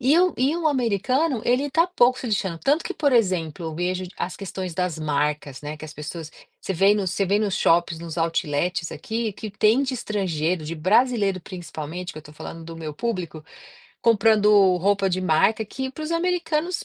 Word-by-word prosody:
e 270 +6 +4
o 365 -1 +4
e 275 +6 +2
o 335 -2 -1
americano 255 - +1
ele 255 +4 +2
tá 325 +4 +3
pouco 255 -7 +3
se 255 - -5
lixando. 190 -5 -1
Tanto 295 - +2
que - - -4
por 285 -3 +1
exemplo, 180 -8 +1
eu 160 - -5
vejo 180 +2 -2
as 185 +1 -4
questões 190 -2 -5
das 175 -2 -2
marcas, 150 -2 -1
né, 150 +1 -6
que 155 - -10
as 155 - -9
pessoas 160 +1 -7 0.3
você - - -3
vem 195 +3 +4
no 200 -2 -1
você 195 +1 0
vem 205 +3 +2
nos 205 -3 0
shoppings, 170 -1 +2
nos 170 0 -7
outlets 165 +1 -1
aqui, 225 -1 -3
que 215 +2 -7
tem 215 +5 +3
de 265 -1 -2
estrangeiro, 180 -7 -1
de 160 +2 -4
brasileiro 200 +2 +2
principalmente, 175 0 -7
que - - -9
eu 155 - -10
tô 150 - -14
falando 165 +2 -9
do 165 0 -8
meu 155 -2 -6
público, 175 -8 -4 0.6
comprando 220 -2 +4 0.3
roupa 195 +1 +1
de 185 - 0
marca. 185 +6 +2
Que 265 +5 -5
para 310 +4 -7
os 315 - -3
americanos, 340 -1 0
195 Hz, 200 wpm, -24 LUFS, 165-245 Hz, 0.6 s, e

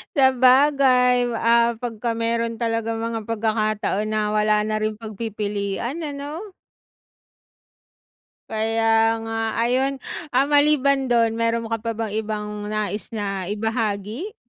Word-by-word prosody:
Sabagay, 260 -1 +5 0.2
ah, 235 0 +3
pag 235 -1 -5
ka 235 - +1
meron 230 0 -1
talagang 225 -1 -1
mga 230 0 -2
pagkakataon 215 -1 0
na 215 -1 0
wala 210 0 +2
na 215 - -1
rin 215 0 -1
pagpipilian 215 - -4
ano. 300 +7 -6 2.0
Kaya 225 0 +2
nga 225 0 -4 0.2
ayun, 265 +3 0 0.3
ah, 270 +2 +4
maliban 280 -2 +3
dun 230 -2 +2
meron 230 0 0
ka 225 - 0
pa 230 +1 -4
bang 225 -1 -3
ibang 210 -1 -4
nais 210 -1 -3
na 195 -3 -3
ibahagi? 220 - -3
225 Hz, 115 wpm, -22 LUFS, 215-250 Hz, 2.0 s, Sabagay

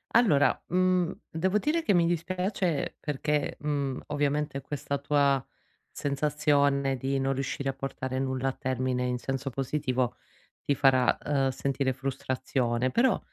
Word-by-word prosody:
Allora, 165 - +4
mhmm, 185 0 +2 0.2
devo 185 +5 0
dire 305 +8 +1
che 205 - +2
mi 170 -1 +4
dispiace 180 0 -1
perché, 150 0 -1
mhmm, 140 -3 -2
ovviamente, 145 -1 -1
questa 140 +1 -3
tua 140 -2 +2 0.5
sensazione 140 -1 +1
di 135 +2 -1
non 135 0 +1
riuscire 135 +1 -2
a - - -1
portare 130 -1 -4
nulla 130 0 0
a - - -1
termine 130 -1 -1
in 125 0 -1
senso 135 +2 -3
positivo 130 -1 -1 0.4
ti 140 - 0
farà, 130 -2 +4
uhm, 135 -2 +2
sentire 135 0 -1
frustrazione, 130 -2 -1
però, 245 +1 +3
140 Hz, 135 wpm, -28 LUFS, 130-150 Hz, 0.5 s, Allora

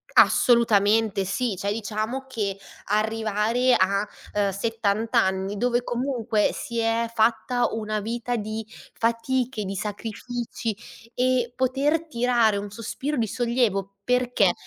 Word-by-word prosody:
Assolutamente 220 -3 +4
sì! 200 +3 -1
Cioè 200 +2 -2
diciamo 220 +4 -3
che 210 -7 -2 0.3
arrivare 220 +3 +1
a, 200 +2 +2 0.3
ehm, 205 -1 +2
70 220 +2 -1
anni 190 -2 +2
dove 245 +2 +1
comunque 240 -4 0
si 235 -5 -4
è 230 0 +1
fatta 230 +2 +2
una 215 -1 -2
vita 235 +3 -3
di 215 0 -4 0.3
fatiche, 235 0 0
di 195 +1 -4
sacrifici 225 +2 -4 0.4
e 250 -1 +1
poter 280 +5 +1
tirare 235 -5 +2
un 205 0 -4
sospiro 265 +7 -4
di 225 -2 +1
sollievo, 215 -4 0
perché 245 -6 +2
225 Hz, 120 wpm, -25 LUFS, 210-245 Hz, 0.4 s, Assolutamente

